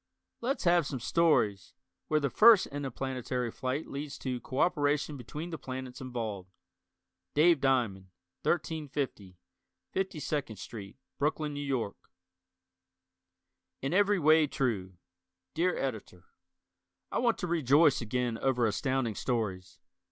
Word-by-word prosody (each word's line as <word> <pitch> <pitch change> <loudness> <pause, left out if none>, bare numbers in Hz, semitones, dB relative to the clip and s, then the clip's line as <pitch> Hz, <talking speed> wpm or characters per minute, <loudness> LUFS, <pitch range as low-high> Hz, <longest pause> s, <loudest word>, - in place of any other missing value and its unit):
Let's 260 +4 -1
have 170 -4 +4
some 135 - -4
stories, 115 - +2 0.3
where 155 - +2
the 140 -3 -1
first 220 -3 +7
interplanetary 130 -3 -3
flight 130 +6 -3
leads 140 0 -6
to 125 -2 -3
cooperation 145 0 +1
between 150 +7 -7
the 160 - -5
planets 130 -1 -6
involved. 110 -7 -4 0.9
Dave 160 -1 +5
Diamond, 115 -9 +1 0.3
1350 145 - -2 0.6
52nd 155 - -2
St., 100 0 -8 0.2
Brooklyn, 150 0 0
N. 140 -2 -1
Y. 110 -4 -3 1.9
In 135 - -1
Every 205 +1 +4
Way, 155 -1 +5
True 100 -10 -2 0.6
Dear 175 +3 +1
Editor: 110 -9 -5 0.9
I - - 0
want 235 -2 +2
to - - -3
rejoice 150 -3 +4
again 120 0 -1
over 125 -3 +2
Astounding 125 +2 0
Stories. 95 -6 -3
135 Hz, 115 wpm, -30 LUFS, 120-155 Hz, 1.9 s, first